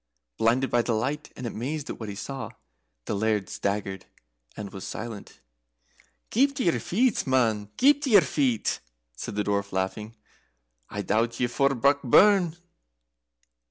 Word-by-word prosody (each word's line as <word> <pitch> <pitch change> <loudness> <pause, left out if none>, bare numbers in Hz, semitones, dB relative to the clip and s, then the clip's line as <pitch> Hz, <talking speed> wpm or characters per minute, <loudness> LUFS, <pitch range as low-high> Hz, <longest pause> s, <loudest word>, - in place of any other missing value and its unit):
Blinded 125 +4 +2
by 120 - +4
the 115 - -1
light, 140 +7 -2
and 125 - -7
amazed 135 +6 -4
at - - -6
what 110 -2 -5
he 100 - -6
saw, 135 +6 -5 0.6
the - - -2
Laird 105 -1 0
staggered, 100 -1 -3 0.5
and 100 -2 -7
was 95 - -7
silent. 110 -2 -7 0.9
"Keep 275 +4 +3
to 275 - -1
your 170 -9 +2
feet, 215 - +1
man 110 -6 +1
keep 285 +2 +5
to 285 - -1
your 205 -5 +8
feet!" 130 -7 0 0.4
said 80 - -6
the 105 - 0
Dwarf, 100 0 -1
laughing. 105 +4 -3 0.7
"I 105 0 -4
doubt 115 +4 0
ye're 125 - +2
fou, 135 +3 +2
Brockburn!" 145 - +4
120 Hz, 150 wpm, -26 LUFS, 105-145 Hz, 0.9 s, your